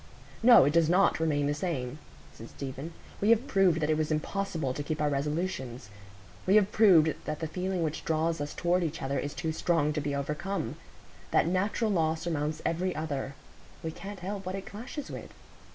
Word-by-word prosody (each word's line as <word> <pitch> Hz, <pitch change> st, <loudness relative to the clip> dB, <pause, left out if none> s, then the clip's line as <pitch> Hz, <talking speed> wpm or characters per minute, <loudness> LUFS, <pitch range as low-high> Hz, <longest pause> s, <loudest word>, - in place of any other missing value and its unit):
"No, 235 Hz, -, +8 dB
it 145 Hz, -, +2 dB
does 165 Hz, -1 st, +4 dB
not 185 Hz, 0 st, +4 dB
remain 150 Hz, -3 st, +1 dB
the 145 Hz, -, +1 dB
same," 145 Hz, -4 st, -3 dB, 0.3 s
said 115 Hz, -, -11 dB
Stephen. 140 Hz, +3 st, -6 dB, 0.3 s
"We 205 Hz, -, +3 dB
have 230 Hz, +2 st, +5 dB
proved 185 Hz, -5 st, +3 dB
that 150 Hz, -, 0 dB
it 155 Hz, -, +2 dB
was 155 Hz, -1 st, 0 dB
impossible 160 Hz, -2 st, -1 dB
to 145 Hz, -, -4 dB
keep 155 Hz, +1 st, -3 dB
our 150 Hz, -1 st, +1 dB
resolutions. 140 Hz, -, -3 dB, 0.6 s
We 195 Hz, -, +5 dB
have 210 Hz, -1 st, +5 dB
proved 170 Hz, -8 st, +6 dB
that 155 Hz, 0 st, -3 dB
the 160 Hz, -, -2 dB
feeling 180 Hz, +2 st, -2 dB
which 155 Hz, 0 st, -3 dB
draws 160 Hz, 0 st, 0 dB
us 145 Hz, -, -4 dB
toward 180 Hz, +1 st, +1 dB
each 165 Hz, -1 st, -3 dB
other 135 Hz, +1 st, -1 dB
is 145 Hz, -, -4 dB
too 165 Hz, -2 st, -2 dB
strong 155 Hz, -2 st, +1 dB
to 150 Hz, -, -1 dB
be 145 Hz, 0 st, -2 dB
overcome. 150 Hz, 0 st, -3 dB, 0.5 s
That -, -, +3 dB
natural 200 Hz, +5 st, 0 dB
law 160 Hz, -4 st, +2 dB
surmounts 155 Hz, -2 st, -3 dB
every 180 Hz, +2 st, 0 dB
other; 140 Hz, -3 st, -3 dB, 0.5 s
we 160 Hz, -, -2 dB
can't 200 Hz, +3 st, -8 dB
help 195 Hz, +2 st, -4 dB
what 185 Hz, +1 st, -4 dB
it 195 Hz, 0 st, -6 dB
clashes 255 Hz, +7 st, -7 dB
with." -, -, -7 dB
160 Hz, 195 wpm, -29 LUFS, 145-185 Hz, 0.6 s, No